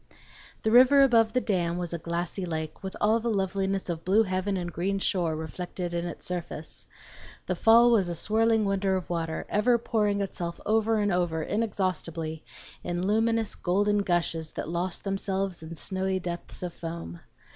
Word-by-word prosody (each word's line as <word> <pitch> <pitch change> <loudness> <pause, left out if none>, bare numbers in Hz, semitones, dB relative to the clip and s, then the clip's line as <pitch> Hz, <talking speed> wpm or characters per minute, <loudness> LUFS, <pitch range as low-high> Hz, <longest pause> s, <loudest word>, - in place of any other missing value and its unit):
The 220 - +1
river 260 +4 +7
above 225 -4 +4
the 255 - +3
dam 175 -6 0
was 175 -1 -3
a 170 - -3
glassy 170 +3 -3
lake 160 -2 -4
with 190 -1 -6
all 220 +2 +3
the 235 +1 -2
loveliness 195 -1 -1
of 165 -2 -4
blue 205 +5 +4
heaven 190 0 -1
and 175 -2 -4
green 195 +4 -1
shore 175 -4 0
reflected 175 +3 -5
in 170 0 -1
its 175 - -8
surface; 170 -3 -6 0.6
the - - -1
fall 235 +1 +6
was 200 -6 +3
a 170 - -3
swirling 220 +4 +2
wonder 195 -1 +1
of 185 -1 -4
water, 165 -2 -2
ever 235 +4 +3
pouring 210 -3 0
itself 170 -3 -4
over 220 +1 +2
and 205 -1 +1
over 175 -3 0
inexhaustibly 170 -7 -2 0.4
in 175 +1 -2
luminous 225 +1 +1
golden 205 +3 +1
gushes 175 -4 -1
that - - -4
lost 175 +2 -3
themselves 195 -2 -2
in 160 +1 -8
snowy 190 +2 -1
depths 175 0 -6
of 175 -1 -4
foam. 165 - -7
190 Hz, 170 wpm, -27 LUFS, 170-210 Hz, 0.6 s, river